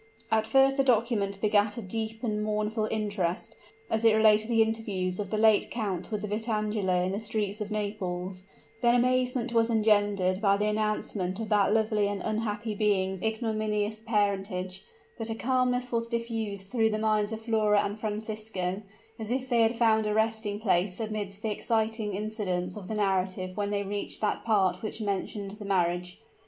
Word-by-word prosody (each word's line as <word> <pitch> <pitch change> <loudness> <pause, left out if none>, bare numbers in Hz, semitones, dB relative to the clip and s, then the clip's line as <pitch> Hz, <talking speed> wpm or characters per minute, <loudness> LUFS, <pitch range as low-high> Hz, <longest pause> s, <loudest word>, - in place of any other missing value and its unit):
At 220 0 +2
first 270 +3 +4
the 275 - +4
document 220 -5 +1
begat 210 0 +2
a - - -3
deep 220 +3 -4
and 210 -2 -1
mournful 215 +1 -1
interest, 205 -5 -2 0.3
as 220 +1 -1
it 225 -1 +6
related 215 0 +5
the 225 -1 +5
interviews 205 -5 -2
of 200 -2 -3
the 215 - -1
late 215 -1 +4
count 195 -6 -3
with 210 -1 -3
Vitangela 210 -4 0
in 185 - -1
the 200 - -2
streets 215 -1 -2
of 210 - -3
Naples; 190 -3 -3 0.4
then 240 0 +4
amazement 250 0 +1
was 230 0 +3
engendered 205 -4 +2
by 200 -2 +4
the 205 - 0
announcement 210 -3 -1
of 220 -1 -4
that 205 -2 +3
lovely 215 -1 +2
and 200 -1 -2
unhappy 215 0 -2
being's 190 -3 +1
ignominious 215 -1 -1
parentage 200 -3 -1 0.4
but 225 0 -3
a 225 - -2
calmness 250 0 0
was 230 -1 0
diffused 225 -4 -3
through 225 -3 +3
the 215 - -1
minds 215 -1 +1
of 220 0 -5
Flora 215 -2 +3
and 205 +2 -4
Francisco, 210 -3 -3 0.4
as 220 -1 -5
if 260 +1 -2
they 240 -2 +3
had 225 +1 +2
found 220 -2 +3
a 210 - 0
resting 220 -2 0
place 185 -2 +1
amidst 210 -2 -4
the 220 - 0
exciting 220 -1 -1
incidents 195 -4 -2
of 200 -3 -8
the 220 - -3
narrative 185 -2 0
when 205 0 -1
they 200 0 -1
reached 200 +1 -3
that 210 - -1
part 200 -5 +2
which 220 0 -4
mentioned 200 -1 -3
the 205 - -7
marriage. 180 -1 0
215 Hz, 175 wpm, -28 LUFS, 200-225 Hz, 0.4 s, it